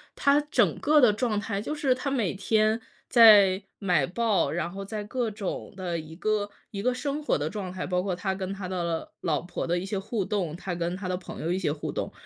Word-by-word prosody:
他 280 +1 +4
整 - - +2
个 300 0 +4
的 245 -6 +6
状 215 -1 0
态 205 -1 -3
就 300 - -3
是 280 -4 +2
他 255 +2 -3
每 230 -10 0
天 215 +3 +1 0.3
在 205 -5 +7 0.2
买 180 -8 +2
报， 220 +1 +1
然 170 - -2
后 195 0 -6
在 210 +1 -5
各 235 +2 -2
种 205 -2 -5
的 175 -3 -2
一 160 +1 -10
个 210 +1 0 0.2
一 200 -1 -4
个 250 - +2
生 285 +3 -3
活 - - +2
的 145 - -2
状 190 -4 -5
态， 185 - -4
包 180 0 0
括 185 -2 -2
他 190 +1 -2
跟 190 0 -4
他 195 -2 -5
的， 185 0 -3
呃， 170 -1 -3
老 155 -5 +1
婆 175 0 -4
的 175 +1 +1
一 180 - -3
些 195 0 -2
互 200 0 -2
动， 180 -7 -2
他 180 0 -5
跟 175 +1 -2
他 190 -1 -5
的 180 - 0
朋 180 - -8
友 170 - -1
一 190 - -1
些 160 -6 0
互 150 - -4
动。 - - -3
195 Hz, 260 characters per minute, -27 LUFS, 180-220 Hz, 0.3 s, 在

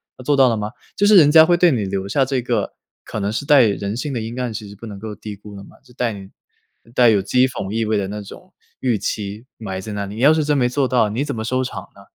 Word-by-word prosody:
他 125 - -12
做 145 +2 +1
到 135 -1 +6
了 115 - +1
吗？” 105 +1 -4 0.2
就 205 - +2
是 210 - +6
人 150 -4 +7
家 160 +1 +9
会 175 +2 +3
对 175 -1 +5
你 115 -7 -1
留 95 0 -3
下 135 +7 +1
这 135 0 -1
个 120 -4 -2 0.3
可 - - -6
能 100 0 -1
是 130 +6 -4
带 145 -3 +7
人 100 0 -1
性 140 +2 -4
的 120 - -2
阴 115 +3 -6
暗 125 -3 -2
其 105 -2 -7
实 100 - -11
不 110 - -11
能 105 -3 -8
够 110 0 -7
低 105 0 -8
估 105 +1 -13
的 100 - -9
嘛， - - -17
就 - - -21
带 120 -3 -1
你 95 -1 -10 0.6
带 120 -1 +5
有 105 -2 +4
讥 125 +6 +3
讽 100 -6 -5
意 115 +1 -1
味 110 0 0
的 100 -2 -1
那 105 +2 -6
种， 180 - -13 0.3
预 125 -4 0
期 105 +3 -4
埋 95 -4 -5
在 105 - -7
那 100 0 -3
里。 100 +1 -8
你 115 - -5
要 145 +4 +6
是 155 -1 +1
真 150 -1 +1
没 125 -2 +2
做 135 +1 0
到， 125 -4 +2
你 115 +7 -2
怎 140 -3 -4
么 110 - -4
收 130 +3 -1
场 110 -7 -5
呢？ 100 - -15
115 Hz, 320 characters per minute, -20 LUFS, 105-130 Hz, 0.6 s, 家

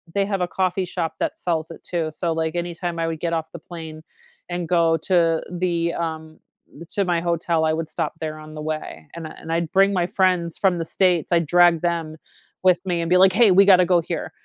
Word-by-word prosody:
they 200 -1 +2
have 195 -1 -2
a 180 - +1
coffee 185 +1 -1
shop 165 -2 -4
that - - -2
sells 160 -2 -2
it - - -12
too, 165 -3 -2
so, 165 +2 -2
like, 160 0 -2
anytime 175 0 -3
I 165 - 0
would 165 -1 -4
get 170 0 -2
off 160 -1 -3
the - - -7
plane, 160 -2 -9 0.5
and 175 -1 -3
go 165 -2 +3
to 165 -1 +2
the, 170 -1 -1
um 160 -1 -5 0.5
to 200 - -1
my 175 -2 0
hotel, 170 -1 0
I 155 - +2
would 160 0 -3
stop - - -3
there 155 -1 -4
on 155 0 -11
the 155 - -6
way, 155 - -5
and 165 -1 -6
I 155 - -10
and 165 - -7
I'd 165 -1 -1
bring 195 +1 +4
my 175 -2 +1
friends 180 -3 0
from 190 -3 +2
the 165 - -2
States; 180 -1 +1
I 170 - +4
drag 170 0 +4
them 165 -2 -2 0.5
with 185 -2 +4
me 175 -2 -1
and 165 - -3
be 180 - +5
like, 190 0 +6
"Hey, 215 -1 +5
we 195 +2 +6
gotta 185 -2 +6
go 175 -1 +3
here." - - -5
170 Hz, 235 wpm, -22 LUFS, 160-180 Hz, 0.5 s, like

